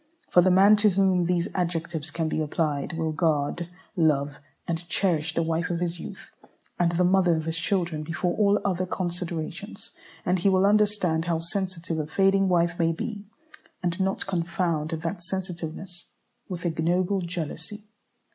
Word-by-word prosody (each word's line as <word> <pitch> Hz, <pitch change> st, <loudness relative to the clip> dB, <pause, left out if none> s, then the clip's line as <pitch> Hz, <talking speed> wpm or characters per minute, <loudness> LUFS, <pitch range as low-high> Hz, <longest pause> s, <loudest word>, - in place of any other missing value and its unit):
For 180 Hz, -, +7 dB
the 185 Hz, -, +4 dB
man 195 Hz, +3 st, +7 dB
to 210 Hz, 0 st, +5 dB
whom 190 Hz, -2 st, +3 dB
these 175 Hz, 0 st, +1 dB
adjectives 170 Hz, -3 st, -1 dB
can 160 Hz, +1 st, -2 dB
be 155 Hz, -, -1 dB
applied 150 Hz, -1 st, -1 dB
will 160 Hz, -1 st, 0 dB
guard, 155 Hz, +2 st, 0 dB, 0.3 s
love, 145 Hz, -4 st, +2 dB, 0.3 s
and 170 Hz, 0 st, -3 dB
cherish 160 Hz, -4 st, +1 dB
the 165 Hz, -, +2 dB
wife 165 Hz, +2 st, -1 dB
of 170 Hz, -1 st, -1 dB
his 175 Hz, 0 st, -2 dB
youth, -, -, -9 dB, 0.5 s
and 170 Hz, -1 st, +2 dB
the 175 Hz, +2 st, +2 dB
mother 180 Hz, -1 st, +4 dB
of 160 Hz, -1 st, -3 dB
his 165 Hz, 0 st, -1 dB
children, 175 Hz, -3 st, 0 dB
before 165 Hz, +3 st, -1 dB
all 205 Hz, -1 st, +3 dB
other 185 Hz, -2 st, 0 dB
considerations; 180 Hz, +4 st, -4 dB, 0.3 s
and 180 Hz, +1 st, +2 dB
he 195 Hz, -, +3 dB
will 190 Hz, 0 st, +4 dB
understand 200 Hz, -6 st, +2 dB
how 170 Hz, -2 st, +1 dB
sensitive 170 Hz, -1 st, -2 dB
a 150 Hz, -, -2 dB
fading 195 Hz, +2 st, +3 dB
wife 170 Hz, -1 st, +2 dB
may 165 Hz, -1 st, +3 dB
be, 205 Hz, +4 st, -5 dB, 0.6 s
and 175 Hz, +1 st, -1 dB
not 190 Hz, 0 st, 0 dB
confound 170 Hz, -3 st, -1 dB
that 165 Hz, +3 st, -3 dB
sensitiveness 175 Hz, -1 st, -5 dB, 0.4 s
with 180 Hz, -1 st, -5 dB
ignoble 175 Hz, +4 st, +1 dB
jealousy. 170 Hz, +4 st, -5 dB
175 Hz, 160 wpm, -26 LUFS, 165-190 Hz, 0.6 s, For